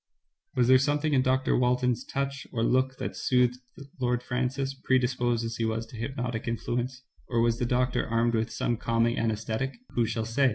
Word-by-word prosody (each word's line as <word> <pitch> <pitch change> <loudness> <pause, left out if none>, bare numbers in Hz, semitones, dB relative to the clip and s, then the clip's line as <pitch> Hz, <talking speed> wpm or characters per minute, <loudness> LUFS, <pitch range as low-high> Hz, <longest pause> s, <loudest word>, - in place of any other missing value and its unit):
Was 125 -2 +3
there 130 0 +7
something 145 +2 +1
in 130 - +4
Dr. 130 0 +2
Walton's 125 0 +2
touch 140 0 -3
or 115 -2 -1
look 130 +2 +2
that - - -4
soothed 125 -1 +2 0.4
Lord 125 -1 0
Francis, 130 +2 -1
predisposed 125 -3 +1
as 115 0 -4
he 115 - 0
was 110 0 -1
to 115 - -13
hypnotic 120 -1 -3
influence, 125 +2 -2 0.3
or 120 - +1
was 115 0 +2
the 120 - 0
doctor 125 +1 +1
armed 115 +1 +1
with 110 0 0
some 115 +1 -1
calming 115 +1 +1
anaesthetic 115 +4 -2
— - - -48
who 120 -2 +2
shall 115 0 -2
say? 130 +4 +3
125 Hz, 190 wpm, -28 LUFS, 115-130 Hz, 0.4 s, there